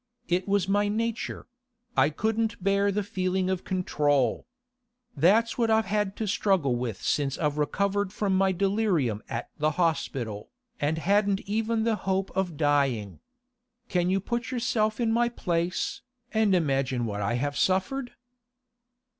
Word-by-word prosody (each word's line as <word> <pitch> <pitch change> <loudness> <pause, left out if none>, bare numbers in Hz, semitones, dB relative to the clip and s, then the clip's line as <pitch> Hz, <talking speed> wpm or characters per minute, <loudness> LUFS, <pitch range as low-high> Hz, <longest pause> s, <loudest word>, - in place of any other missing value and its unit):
It 180 +2 0
was 200 -2 +1
my 205 +1 +2
nature; 230 +2 -2 0.5
I 135 +2 +4
couldn't 220 +4 -1
bear 200 +1 +2
the 205 +1 -1
feeling 185 -1 -1
of 185 -1 -2
control. 150 -7 0 0.7
That's 210 - +3
what 230 -1 +2
I've 220 0 +3
had 205 -1 -1
to 220 - -3
struggle 190 -10 +2
with 120 -5 -4
since 140 -3 0
I 150 - +1
recovered 195 +7 0
from 200 -2 0
my 190 0 +3
delirium 185 - +1
at 115 - -4
the 155 +1 +3
hospital, 135 - -1 0.3
and 155 +1 0
hadn't 200 +3 +2
even 220 +2 -1
the 225 -1 +1
hope 195 -1 -1
of 180 -5 -1
dying. 140 - +1 0.7
Can 180 -2 +1
you 190 +1 +2
put 235 +4 -3
yourself 225 -4 0
in 230 -2 +1
my 235 +1 +2
place, 175 -5 -2 0.3
and 220 -3 +3
imagine 135 -6 0
what 105 -2 -3
I 115 +4 0
have 145 +3 -1
suffered? 190 - 0
190 Hz, 145 wpm, -27 LUFS, 145-210 Hz, 0.7 s, I